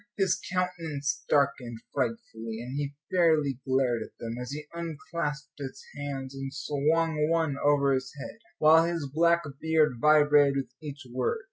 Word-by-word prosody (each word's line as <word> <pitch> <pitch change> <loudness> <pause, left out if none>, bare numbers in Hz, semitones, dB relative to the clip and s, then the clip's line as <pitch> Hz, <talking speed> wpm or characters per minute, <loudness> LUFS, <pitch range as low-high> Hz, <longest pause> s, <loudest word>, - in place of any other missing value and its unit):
His 190 -3 +1
countenance 165 -6 -2
darkened 140 -5 +1 0.2
frightfully, 115 - -3
and 125 +3 -6
he 145 0 -3 0.2
fairly 155 -7 +3
glared 130 -3 +2
at - - -9
them, 115 0 -4
as 125 - -6
he 150 +1 -5
unclasped 160 -2 -4
his 135 -1 -6 0.2
hands 140 -2 -5
and 135 0 -5
swung 150 +2 +1
one 165 -4 +1
over 140 -1 +4
his 130 -1 -2
head, 180 - -8 0.2
while 160 +1 +6
his 165 -3 -2
black 170 +4 +3 0.2
beard 160 -5 +2
vibrated 145 -2 +5
with 135 -1 -3
each 145 -2 -8
word. 130 - 0
145 Hz, 150 wpm, -28 LUFS, 135-160 Hz, 0.2 s, while